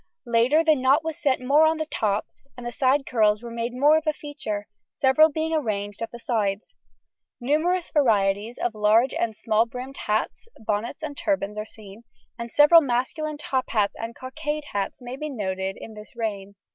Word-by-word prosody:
Later 240 +7 +3
the 320 -1 +5
knot 275 +3 +3
was 320 -1 -3
set 270 -3 +1
more 285 +5 +4
on 320 0 +1
the 315 - -2
top, 215 -8 -1 0.3
and 245 - -8
the 240 - -3
side 270 +3 +2
curls 215 -2 +2
were 235 - -7
made 235 +1 -3
more 290 +5 +4
of 315 0 -4
a 310 - +3
feature, 290 -9 -6 0.2
several 280 +4 +4
being 320 +2 -2
arranged 205 -9 -2
at 230 - -3
the 235 - -8
sides. 215 -4 -2 0.7
Numerous 320 +8 0
varieties 215 -5 +1
of 240 - -1
large 215 +4 +3
and 220 -2 -2
small 225 +1 +1
brimmed 255 +3 -8
hats, 215 - -2
bonnets, 220 +7 -3
and 295 -2 -5
turbans 280 -10 -1
are 215 - -4
seen, 215 0 -13 0.4
and 235 0 -6
several 300 +3 +7
masculine 295 +4 -2
top 265 -3 -2
hats 210 -3 +1
and 230 0 -6
cockade 295 +3 -4
hats 200 +5 -3
may 245 +1 -6
be 305 +2 -4
noted 190 -6 -3
late - - -14
in 220 - -9
this 215 +2 -13
reign. 200 -4 -4
240 Hz, 190 wpm, -24 LUFS, 215-295 Hz, 0.7 s, several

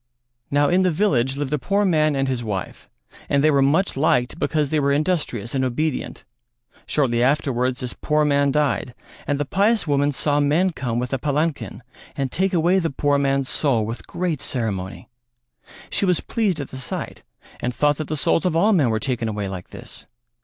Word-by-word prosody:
Now 145 +1 +3
in 180 +4 +3
the 185 - +3
village 140 - +1
lived 145 0 -2
a 150 - +1
poor 200 +7 +1
man 155 -5 +2
and 135 0 0
his 125 -2 -2
wife 100 -4 -5 0.4
and 140 0 +2
they 155 - +5
were 140 -1 +3
much 155 +8 +2
liked 135 0 +1
because 150 -3 0
they 155 - +2
were 140 -1 +2
industrious 145 - -1
and 135 -1 0
obedient; 130 +3 -2 0.6
shortly 120 -5 +1
afterwards 130 -2 +1
this 125 -1 -4
poor 150 0 +1
man 140 -1 +3
died 145 -4 0 0.3
and 145 0 0
the 145 - 0
pious 205 - +2
woman 145 -1 +2
saw 145 +1 +1
men 155 +6 +2
come 125 -6 -3
with 125 +2 -2
a 135 - 0
palankin 150 -2 -2 0.3
and 135 -2 -2
take 190 +1 0
away 175 +1 +3
the 165 -3 -1
poor 145 +1 +1
man's 135 -1 +1
soul 125 -8 +1
with 115 +3 -6
great 170 -5 -2
ceremony. 100 -7 -3 0.8
She - - +1
was 180 -3 +2
pleased 205 -8 -1
at 140 - -5
the 130 - -7
sight 130 - -6 0.4
and 125 - -2
thought 145 +3 +1
that 155 - -4
the 155 - -2
souls 165 - +2
of 180 -3 0
all 205 +7 +4
men 150 -10 +3
were 110 - +1
taken 125 -2 -2
away 105 -2 -3
like 95 -2 -7
this. - - -8
145 Hz, 195 wpm, -22 LUFS, 130-155 Hz, 0.8 s, they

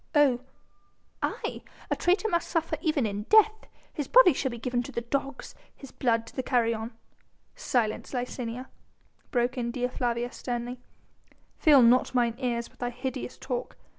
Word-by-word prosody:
"Oh!" 280 -5 +5 0.8
"Aye! - - -3 0.3
a - - +3
traitor 375 +5 +2
must 340 -5 0
suffer 330 -1 0
even 310 -6 +1
in 205 0 -3
death. 435 0 +5 0.3
His 295 - -3
body 465 -9 +7
shall 265 0 -1
be 240 - -6
given 245 +1 -1
to 245 - -7
the 235 - -3
dogs, 275 +3 -3 0.2
his 275 - -12
blood 230 -3 +1
to - - -14
the 260 - -1
carrion...." 230 -3 0 0.6
"Silence, 245 - -1
Licinia!" 250 -1 -4 0.6
broke 245 +1 0
in 235 -1 -1
Dea 250 +1 -1
Flavia 240 -1 -1
sternly, 245 0 -4 0.8
"fill 290 -6 +7
not 250 +2 +4
mine 240 -2 +3
ears 235 -3 -1
with - - -27
thy 245 - -1
hideous 255 +1 -5
talk. 250 -2 -4
250 Hz, 160 wpm, -28 LUFS, 235-275 Hz, 0.8 s, body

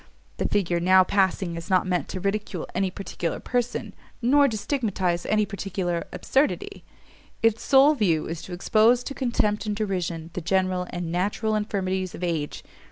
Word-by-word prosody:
The - - 0
figure 175 -4 +1
now 185 +2 +6
passing 190 -2 +1
is 165 0 -7
not 185 -1 +3
meant 180 -1 -1
to 185 - -5
ridicule 200 -2 -2
any 190 +1 0
particular 180 -3 -4
person, 245 -1 -2 0.3
nor 280 +4 +4
to 220 -4 -2
stigmatize 200 -7 -1
any 215 0 +2
particular 185 -3 -3
absurdity; 275 +3 -1 0.6
its 225 0 +3
sole 275 +2 +6
view 175 - +1
is 165 0 -5
to - - -10
expose 220 +6 +3
to 275 - -5
contempt 225 -5 0
and 210 - -1
derision 180 -6 -3
the 180 - -4
general 185 +1 0
and 175 -2 -4
natural 205 +5 0
infirmities 190 -3 -1
of 180 - -8
age! 160 -4 -2
190 Hz, 165 wpm, -25 LUFS, 175-215 Hz, 0.6 s, now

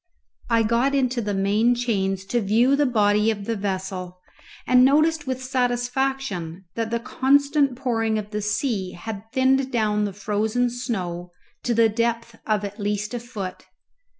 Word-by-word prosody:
I 230 -1 +3
got 235 +5 +2
into 255 -3 +1
the 205 -2 -2
main 210 +5 +2
chains 195 -6 -1
to 240 +4 0
view 230 +7 +3
the 290 0 +2
body 210 -2 +3
of 205 -3 -2
the 230 - -1
vessel, 190 -2 -4 0.5
and 250 0 +5
noticed 300 +2 +3
with 260 0 -3
satisfaction 245 -8 -1
that 230 -1 -2
the 235 0 -1
constant 280 +2 +2
pouring 225 -3 0
of 210 -1 -5
the 210 -1 -2
sea 210 -3 -1
had 220 +3 -8
thinned 265 +1 +2
down 210 -3 +1
the 200 - -4
frozen 215 +4 0
snow 180 -8 -4 0.3
to 240 - -1
the 230 0 +5
depth 230 +1 -1
of 210 -2 +1
at 205 +2 -8
least 210 +2 -2
a 240 - -2
foot. 215 -6 -7
225 Hz, 160 wpm, -23 LUFS, 205-250 Hz, 0.5 s, and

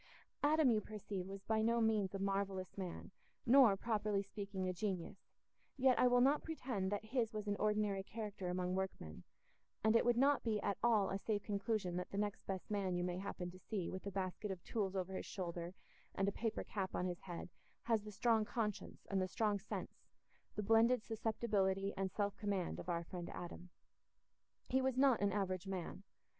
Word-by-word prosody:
Adam, 295 -2 +5
you 215 -2 +3
perceive, 200 -3 -5
was 195 0 -7
by 220 0 +1
no 230 +1 +3
means 215 -4 +2
a - - 0
marvellous 195 -1 -1
man, 185 -2 -5 0.3
nor, 245 -5 +7
properly 210 -2 0
speaking, 200 -1 -4
a 185 - 0
genius, 180 -2 -3 0.6
yet 260 -1 +4
I 250 - +6
will 245 0 +5
not 280 +4 +5
pretend 245 -12 -2
that 205 +1 -2
his 225 -1 0
was 210 -1 -4
an 205 - +1
ordinary 210 -2 +1
character 205 -2 -5
among 180 0 -1
workmen; 185 - -3 0.6
and 220 +1 +4
it 230 - +6
would 240 -1 +3
not 280 +2 +4
be 220 -3 0
at 200 -1 -1
all 220 -4 +4
a 195 - -1
safe 205 0 -1
conclusion 200 -3 -1
that 180 - -3
the 200 - -5
next 205 -1 -2
best 190 +1 -4
man 195 -3 0
you 175 - 0
may 180 0 -1
happen 180 -2 -4
to 185 - -13
see 190 -3 -3
with 185 - -5
a - - -2
basket 190 +2 -3
of 185 -3 -5
tools 200 -4 -1
over 190 0 -2
his - - -4
shoulder 175 -2 -4 0.4
and 195 - +1
a - - +3
paper 225 +2 -2
cap 190 -3 -3
on 180 - 0
his 180 -1 -2
head 175 -1 -6 0.3
has 225 -2 +2
the 210 0 -8
strong 225 +1 +3
conscience 210 -2 -3
and 195 -1 +2
the 185 - +1
strong 205 +1 +1
sense, 195 - -6 0.5
the 210 - -1
blended 225 +2 +5
susceptibility 210 -3 0
and 190 -1 -1
self 205 -1 -1
command, 200 -4 -1
of - - -6
our 170 -1 0
friend 175 0 -6
Adam. 175 +1 -7 1.0
He 260 +1 +2
was 260 -1 +1
not 265 -4 +5
an 200 0 +3
average 185 -2 -1
man. 190 -1 -4
200 Hz, 200 wpm, -38 LUFS, 190-220 Hz, 1.0 s, nor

